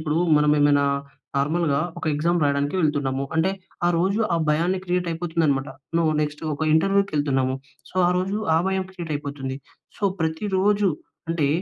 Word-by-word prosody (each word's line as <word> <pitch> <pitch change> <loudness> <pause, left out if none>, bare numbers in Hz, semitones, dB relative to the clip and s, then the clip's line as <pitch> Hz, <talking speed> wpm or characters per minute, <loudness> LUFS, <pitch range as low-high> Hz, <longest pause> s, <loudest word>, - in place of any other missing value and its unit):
ఇప్పుడు 155 0 0 0.2
మనం 150 0 +3
ఏమైనా 145 -1 +4 0.5
నార్మల్‌గా 145 +1 +1 0.2
ఒక - - -6
ఎక్సామ్ 170 +2 +1
రాయడానికి 140 +2 0
వెళ్తున్నాము. 140 -3 0
అంటే, 165 +4 +3 0.4
ఆ - - +4
రోజు 190 +4 +1 0.2
ఆ - - +2
భయాన్ని 170 +5 +2
క్రియేట్ 180 -1 0
అయిపోతుంది 165 0 -1
అన్నమాట. 135 0 0 0.3
నువు 160 -2 +3
నెక్స్ట్ 150 0 -4
ఒక 145 - -12
ఇంటర్వ్యూకెళ్తున్నాము 150 -8 +2 0.4
సో, 185 - -13
ఆ - - +3
రోజు 190 +3 -1 0.2
ఆ - - +5
భయం 190 0 0
క్రియేటైపోతుంది. 145 -6 -4 0.4
సో, - - -2 0.2
ప్రతిరోజు 195 +5 +1 0.4
అంటే 160 -4 +1
160 Hz, 150 wpm, -24 LUFS, 145-180 Hz, 0.5 s, ఆ